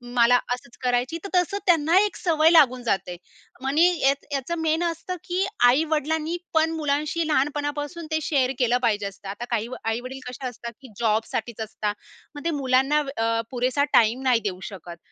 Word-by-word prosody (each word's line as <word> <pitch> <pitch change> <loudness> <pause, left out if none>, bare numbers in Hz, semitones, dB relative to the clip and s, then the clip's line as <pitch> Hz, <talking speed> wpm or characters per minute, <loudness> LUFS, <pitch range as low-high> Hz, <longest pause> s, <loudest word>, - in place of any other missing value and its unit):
मला 240 0 +5 0.2
असंच 245 -1 -9
करायची. 250 +5 0
तर 395 - -6
तसं 360 +2 +2
त्यांना 330 -1 +4
एक 420 0 +1
सवय 320 -2 +3
लागून 255 -7 +5
जाते. 190 -6 -1 0.5
मनी 290 +6 +3 0.2
यात 275 +1 +2
याचं 280 +5 -2
मेन 320 +1 +1
असतं, 335 +2 -3
की 370 +1 -1 0.2
आई-वडिलांनी 310 +4 +1 0.2
पण 320 0 +3
मुलांशी 305 +1 -1
लहानपणापासून 290 +2 -1
ते 315 - +1
शेअर 270 -4 +1
केलं 245 -1 +3
पाहिजे 210 -4 +1
असतं. 200 0 -11
आता 210 +5 -5
काही 230 -1 0
व 255 - -7
आई-वडील 245 +4 -3
कसे 255 +1 -5
असतात, 235 -1 -7
की 265 - -12
जॉबसाठीच 225 0 -1
असतात. 210 -1 -3 0.4
मग 290 - -9
ते 335 - +1
मुलांना 265 +3 +2
वेळ 275 -5 -4
अ, 230 0 +1
पुरेसा 255 +3 +1
टाईम 230 +3 +4
नाही 250 -3 +3
देऊ 185 -3 -3
शकत. 175 -4 -10
270 Hz, 175 wpm, -24 LUFS, 235-315 Hz, 0.5 s, मला